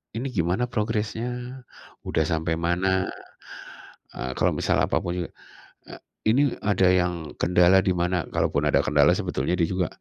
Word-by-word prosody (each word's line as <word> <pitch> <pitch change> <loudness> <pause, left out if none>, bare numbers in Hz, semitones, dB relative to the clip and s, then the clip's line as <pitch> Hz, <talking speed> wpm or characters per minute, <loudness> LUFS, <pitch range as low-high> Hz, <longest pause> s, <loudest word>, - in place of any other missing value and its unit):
ini 120 +4 -3
gimana 90 +7 0
progresnya, 120 +3 -3 0.4
udah 80 - +1
sampai 80 0 0
mana, 85 +3 0 1.3
eee, 65 0 -4
kalau - - +2
misal - - +1
apapun 85 - -1
juga, - - -8 0.6
eee, - - -10 0.3
ini 125 +6 +4 0.2
ada 100 -2 0
yang 90 -1 +2 0.3
kendala 90 +1 +4
di 95 - +3
mana 90 0 -1
kalaupun - - 0
ada - - +3
kendala 70 -1 +4
sebetulnya 70 +7 -1
dia 85 - +3
juga, 90 -2 0
90 Hz, 145 wpm, -25 LUFS, 85-110 Hz, 1.3 s, ini